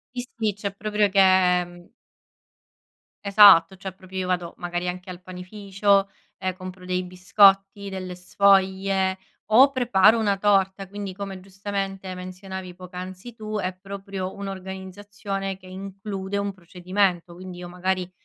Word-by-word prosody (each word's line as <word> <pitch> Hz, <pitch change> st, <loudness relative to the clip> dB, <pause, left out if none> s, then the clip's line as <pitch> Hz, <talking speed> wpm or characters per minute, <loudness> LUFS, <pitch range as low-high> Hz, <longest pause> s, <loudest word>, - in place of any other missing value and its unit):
Sì, 245 Hz, 0 st, -4 dB
sì, 215 Hz, -3 st, 0 dB
cioè 200 Hz, 0 st, -4 dB
proprio 210 Hz, 0 st, +1 dB
che, 195 Hz, 0 st, +2 dB, 0.5 s
mhmm 175 Hz, 0 st, -16 dB, 1.3 s
Esatto, 195 Hz, -3 st, +7 dB
cioè 190 Hz, 0 st, -7 dB
proprio 190 Hz, 0 st, -11 dB
io 185 Hz, -1 st, -2 dB
vado, 180 Hz, -2 st, -2 dB
magari 175 Hz, 0 st, -3 dB
anche 180 Hz, +1 st, -7 dB
al 180 Hz, 0 st, -8 dB
panificio 195 Hz, +2 st, 0 dB, 0.3 s
e 185 Hz, -1 st, -2 dB
compro 185 Hz, 0 st, -9 dB
dei 180 Hz, 0 st, -2 dB
biscotti, 195 Hz, +2 st, +3 dB
delle 185 Hz, -2 st, -6 dB
sfoglie 190 Hz, 0 st, +2 dB, 0.3 s
o 265 Hz, +6 st, +7 dB
preparo 230 Hz, -4 st, +4 dB
una 205 Hz, -3 st, +2 dB
torta. 195 Hz, -1 st, +1 dB
Quindi, 200 Hz, -1 st, -6 dB
come 195 Hz, -1 st, -6 dB
giustamente 195 Hz, 0 st, -5 dB
menzionavi 185 Hz, 0 st, -8 dB
poc'anzi 185 Hz, +4 st, -9 dB
tu, 215 Hz, -1 st, -5 dB
è 185 Hz, -1 st, -2 dB
proprio 195 Hz, -1 st, -6 dB
un'organizzazione 195 Hz, 0 st, -6 dB
che 185 Hz, 0 st, -16 dB
include 195 Hz, +1 st, -6 dB
un 200 Hz, 0 st, -1 dB
procedimento. 180 Hz, 0 st, -1 dB
Quindi 180 Hz, 0 st, -9 dB
io 175 Hz, 0 st, -8 dB
magari 185 Hz, 0 st, -2 dB
190 Hz, 135 wpm, -24 LUFS, 185-200 Hz, 1.3 s, Esatto